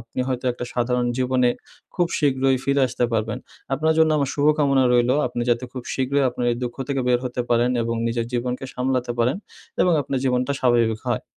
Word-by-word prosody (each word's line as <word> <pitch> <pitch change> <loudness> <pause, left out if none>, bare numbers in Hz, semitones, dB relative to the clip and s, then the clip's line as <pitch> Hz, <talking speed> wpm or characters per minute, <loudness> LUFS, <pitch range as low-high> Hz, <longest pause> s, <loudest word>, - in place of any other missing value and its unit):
আপনি 115 +2 -11
হয়তো 130 0 -3
একটা 120 - -6
সাধারণ 125 0 0
জীবনে 125 -1 +2 0.4
খুব 175 -2 +2
শীঘ্রই 135 -2 +2
ফিরে 140 +1 +2
আসতে 125 - -1
পারবেন। 110 -1 -1 0.4
আপনার 155 +4 +1
জন্য 160 0 +5
আমার 140 -2 0
শুভকামনা 145 -2 +3
রইলো, 120 +1 +3
আপনি 120 - -3
যাতে 120 +1 +1
খুব 125 - -6
শীঘ্রই 135 +1 +1
আপনার 120 0 -3
এই - - -3
দুঃখ 120 -1 -4
থেকে 140 -1 0
বের 125 - +4
হতে 125 0 -3
পারেন 120 +1 +3
এবং 115 0 -2
নিজের 115 0 -1
জীবনকে 125 +1 -2
সামলাতে 125 -1 -1
পারেন 120 +8 +2 0.4
এবং 180 - +4
আপনার 135 0 -2
জীবনটা 125 +1 +1
স্বাভাবিক 115 -3 +2
হয়। - - -1
125 Hz, 190 wpm, -22 LUFS, 120-135 Hz, 0.4 s, জন্য